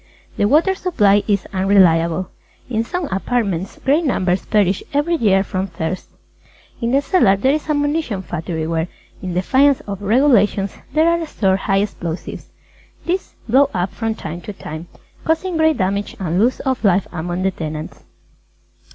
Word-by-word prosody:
The - - +1
Water 320 - +4
Supply 210 - +2
is 200 -3 +1
unreliable. 185 -3 +3 0.4
In 225 -2 -1
some 355 +8 -3
apartments, 195 -2 -1
great 290 +6 +3
numbers 185 - 0
perish 200 -3 +2
every 295 +4 +1
year 200 - +3
from 190 -1 -3
thirst. 170 0 -4 0.7
In 230 - 0
the 275 +3 +2
cellar 280 - +4
there 260 +8 +2
is 310 +1 -3
a 305 - +2
munition 290 -9 -1
factory 165 -2 -4
where, 165 +1 -1 0.3
in 180 -2 -4
defiance 265 +9 +3
of 200 -1 -7
regulations, 210 -3 +3 0.2
there 315 +2 +4
are 335 0 +2
stored 190 -9 +1
High 195 0 +1
Explosives. 175 -5 -6 0.6
These 365 +2 -2
blow 270 +4 +4
up 180 +1 -1
from 225 -1 -2
time 170 -3 -7
to 210 - -7
time, 160 -2 -8 0.4
causing 330 +3 0
great 315 -1 +3
damage 200 +2 -1
and 180 +1 +1
loss 250 +2 +1
of 260 -3 -2
life 195 -2 +3
among 175 +2 -3
the 190 - +2
tenants. 155 -3 -6
200 Hz, 160 wpm, -19 LUFS, 185-275 Hz, 0.7 s, Water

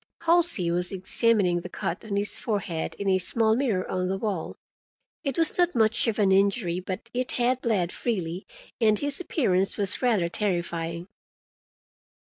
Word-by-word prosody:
Halsey 335 - +2
was 175 +1 -1
examining 190 -1 +1
the 180 - -8
cut 175 +1 -4
on 210 -2 -4
his 205 +1 0
forehead 200 -7 -3
in 200 - -4
a 190 -1 +3
small 220 +4 +2
mirror 225 -8 0
on 185 0 -2
the 190 - -1
wall. 195 -5 -3 0.7
It 275 -3 -2
was 330 -1 +3
not 350 -3 +2
much 225 +1 +2
of 225 - 0
an 200 -3 +3
injury, 195 -2 +2
but 185 +5 -6
it 250 0 +1
had 250 +1 +1
bled 190 -7 0
freely, 185 -6 -3 0.3
and 215 -3 +4
his 285 +2 -2
appearance 195 - 0
was 200 -3 +2
rather 220 -9 +2
terrifying. 170 -3 -3
200 Hz, 160 wpm, -26 LUFS, 180-235 Hz, 0.7 s, and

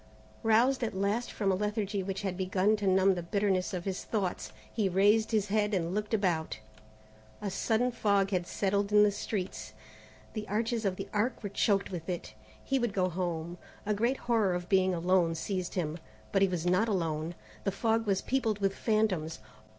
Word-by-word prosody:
Roused 240 +4 +3
at 220 -4 -2
last 200 +5 0
from 200 -2 0
a - - +2
lethargy 205 0 -1
which 195 +1 -4
had 190 -2 -2
begun 190 +3 +2
to 205 -1 -2
numb 190 +1 +5
the 175 - -3
bitterness 190 +1 0
of 180 -2 -4
his 190 -1 -3
thoughts, 195 -5 -2 0.2
he 210 -4 +1
raised 205 +4 +4
his 210 -3 +1
head 210 0 +1
and 170 -1 -1
looked 210 +1 -2
about. 175 -6 0 0.8
A 205 -2 -3
sudden 230 +5 +1
fog 200 -4 +1
had 180 -2 0
settled 200 +1 0
in 210 0 +7
the 210 - +4
streets; 180 - -4 0.6
the 215 -1 -5
arches 225 +1 -1
of 190 -2 +1
the 195 +1 -6
Arc 225 +3 0
were 205 - -3
choked 200 0 +1
with 175 -1 -5
it. 175 -11 -4 0.3
He 270 -1 +1
would 240 -4 -1
go 185 -1 +2
home. 175 -1 -3 0.3
A 210 - +1
great 235 +6 +1
horror 220 -6 +2
of 175 0 -4
being 190 -2 +3
alone 175 -1 +2
seized 185 +1 -3
him. 165 -2 -2 0.3
But 195 - +2
he 195 - +6
was 175 -3 -3
not 185 +5 +3
alone. 165 -3 -1 0.3
The 195 - 0
fog 225 +2 0
was 195 -1 +1
peopled 240 -5 0
with 195 -1 0
phantoms. 195 -9 0
195 Hz, 190 wpm, -30 LUFS, 180-215 Hz, 0.8 s, in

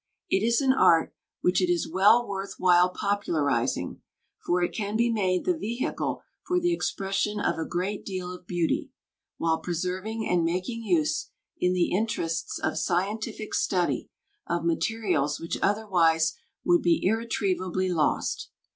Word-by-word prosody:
It 190 - +3
is 235 +2 +3
an 265 -1 +4
art 165 -10 +4 0.3
which 180 +1 +2
it 180 -1 +2
is 175 -2 0
well 200 +8 +4
worth 195 0 -5
while 180 0 +5
popularizing, 180 -7 -1 0.4
for 175 0 +1
it - - -1
can 210 0 -2
be 235 +1 +2
made 185 -5 0
the 360 - +2
vehicle 235 -4 -3 0.2
for 360 0 0
the 350 0 +1
expression 205 - -1
of 185 - 0
a 160 - -3
great 190 +4 -2
deal 185 -2 -4
of 180 -1 -12
beauty, 175 -2 0 0.5
while 160 -1 +1
preserving 185 +6 -3
and 175 -2 +2
making 185 +8 -2
use, 160 -7 0 0.3
in 180 0 +2
the 180 -1 +1
interests 170 -5 -1
of - - -1
scientific 215 +4 -2
study, 180 -3 0 0.4
of 170 0 -1
materials 170 -5 0
which 165 - -4
otherwise 170 -6 +2 0.3
would 175 0 +4
be 170 -1 +3
irretrievably 185 -4 0
lost. 160 -4 0
185 Hz, 145 wpm, -27 LUFS, 175-215 Hz, 0.5 s, while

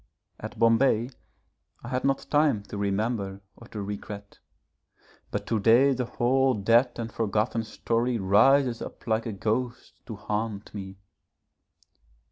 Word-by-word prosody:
At - - -8
Bombay 115 +1 +3 0.7
I 120 - -7
had 130 0 -2
not 135 0 0
time 145 -8 +3
to 100 - -8
remember 100 -1 -2
or 115 - -14
to 105 -3 -6
regret; 100 0 -7 0.9
but - - -4
to 115 - 0
day 120 +7 +5
the 125 -1 -2
whole 130 +2 +2
dead 115 +5 +3
and 115 -1 -4
forgotten 110 +1 0
story 115 +2 -1
rises 115 +6 +4
up - - -9
like 110 0 0
a - - -2
ghost 115 +5 -3
to 110 - -6
haunt 105 0 -4
me. 95 -2 -7
115 Hz, 135 wpm, -27 LUFS, 105-125 Hz, 0.9 s, day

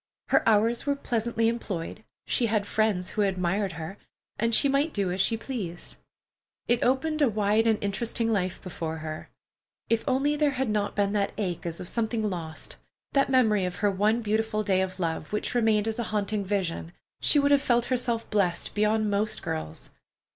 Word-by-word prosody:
Her - - +5
hours 225 +4 +2
were 285 - +2
pleasantly 230 -3 0
employed, 220 -6 -3 0.2
she 240 - +1
had 215 -2 +1
friends 205 -4 0
who 215 - -1
admired 190 0 0
her, 165 +5 -7 0.4
and 230 -1 +2
she 280 - +5
might 280 +3 +1
do 195 -3 +1
as 185 +1 0
she 225 +4 +2
pleased. 205 -9 -4 0.7
It 240 0 +2
opened 305 +5 +1
a 280 - +5
wide 215 +1 +2
and 220 -1 +3
interesting 225 +3 0
life 185 -3 -1
before 165 -3 -4
her. 155 0 -6 0.6
If 230 0 +2
only 275 +3 +2
there 295 -1 +2
had 265 -2 0
not 210 -1 -1
been 200 0 +1
that 200 -1 0
ache 180 -4 -3
as 165 -1 -5
of 180 - -6
something 220 0 0
lost, 165 -5 -5 0.4
that 275 -1 +3
memory 220 -7 +3
of 180 -1 -2
her 205 -1 +1
one 210 +4 +1
beautiful 215 0 0
day 190 -2 +2
of 185 0 -3
love, 165 -3 -2
which 210 - -1
remained 220 -3 +2
as 225 +1 -2
a - - +1
haunting 210 -1 0
vision, 185 -4 -2 0.3
she - - +4
would 285 0 +4
have 285 -1 +5
felt 240 -3 +2
herself 235 -2 -1
blest 190 -5 0
beyond 215 0 +2
most 210 +2 0
girls. 80 0 -5
215 Hz, 185 wpm, -27 LUFS, 190-235 Hz, 0.7 s, Her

